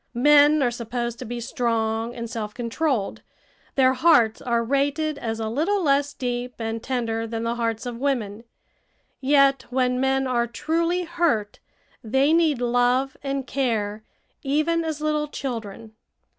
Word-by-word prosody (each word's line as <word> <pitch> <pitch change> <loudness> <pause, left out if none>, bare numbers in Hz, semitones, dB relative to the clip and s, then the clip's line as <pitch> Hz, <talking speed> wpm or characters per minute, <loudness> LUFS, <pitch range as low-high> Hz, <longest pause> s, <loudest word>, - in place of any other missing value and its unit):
Men 295 +2 +6
are 245 - +2
supposed 235 0 -4
to - - -6
be 240 +1 -5
strong 230 -1 -1
and 235 -1 -5
self 215 -2 -5
controlled; 245 -1 -1 0.5
their 260 -1 +4
hearts 250 -6 +4
are 235 -1 0
rated 285 +4 0
as 225 -1 -3
a 220 - -2
little 335 - 0
less 285 -1 +2
deep 245 0 -3
and 225 0 -3
tender 230 -3 -2
than 225 0 -4
the 230 0 0
hearts 230 -1 -2
of 240 -1 -5
women; 230 -6 -2 0.8
yet 275 -1 +3
when 250 0 +1
men 265 0 +1
are 240 -2 0
truly 335 +8 -1
hurt 330 -12 -1 0.4
they 265 +7 +2
need 315 -6 +2
love 245 +2 +2
and 275 -1 -3
care 220 -7 -1 0.4
even 310 +4 +1
as 315 -2 -4
little 305 0 0
children. 225 -6 -6
250 Hz, 145 wpm, -24 LUFS, 230-285 Hz, 0.8 s, Men